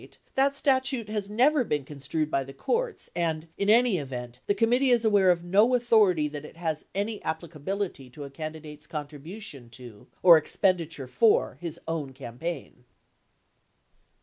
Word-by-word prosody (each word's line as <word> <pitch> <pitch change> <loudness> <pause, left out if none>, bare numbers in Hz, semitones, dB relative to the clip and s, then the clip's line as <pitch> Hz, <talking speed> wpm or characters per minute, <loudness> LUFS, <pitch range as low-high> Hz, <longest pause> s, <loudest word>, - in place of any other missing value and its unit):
890 - - -17
that 275 +1 +2
statute 260 -5 +1
has 210 -2 -3
never 260 +6 +3
been 150 - -2
construed 150 +2 -3
by 135 - +1
the 135 +1 -11
courts 470 - -2
and, 165 -2 -1
in 200 - -1
any 230 -4 +4
event, 125 -3 -7
the 205 - +2
committee 245 +4 +3
is 240 -2 +3
aware 200 -3 +4
of 175 -1 +2
no 205 +8 +4
authority 210 -10 +3
that 145 0 -7
it 150 - -12
has 160 -3 -3
any 205 +2 -2
applicability 160 -1 -4
to 145 +4 -9
a 140 - -9
candidate's 155 0 -8
contribution 150 - -8
to 120 -4 -12 0.2
or 175 -3 +9
expenditure 160 -2 0
for 220 - +2
his 170 -2 -5
own 155 -5 -3
campaign. 130 +1 -7
165 Hz, 155 wpm, -27 LUFS, 145-215 Hz, 0.2 s, or